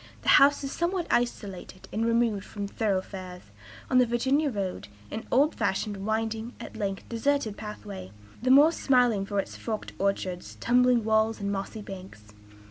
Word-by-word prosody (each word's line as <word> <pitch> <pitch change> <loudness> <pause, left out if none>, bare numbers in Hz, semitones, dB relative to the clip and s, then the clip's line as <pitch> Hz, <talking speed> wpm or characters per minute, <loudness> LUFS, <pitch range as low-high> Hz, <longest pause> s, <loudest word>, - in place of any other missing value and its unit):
The - - 0
house 285 +1 +5
is 275 - -3
somewhat 345 0 -1
isolate 200 -6 -2
and 220 - 0
remote 230 -4 +2
from 205 -1 -5
thoroughfares; 185 -3 -3 0.4
on 255 - +4
the 250 - +4
Virginia 270 +6 +1
road, 195 - -4 0.2
an 225 - -5
old 285 +5 +4
fashioned, 205 +1 -1
winding, 225 +2 -2
at - - -9
length 195 -1 -3
deserted 235 -2 0
pathway, 210 - -8 0.3
the 255 - 0
more 285 +5 +8
smiling 245 -10 +2
for 205 - -3
its - - -4
forked 220 -2 -5
orchards, 190 -2 -2
tumbling 245 -1 +3
walls, 220 +1 +2
and 200 0 -2
mossy 200 +2 -4
banks. 185 - -10
220 Hz, 155 wpm, -27 LUFS, 195-250 Hz, 0.4 s, more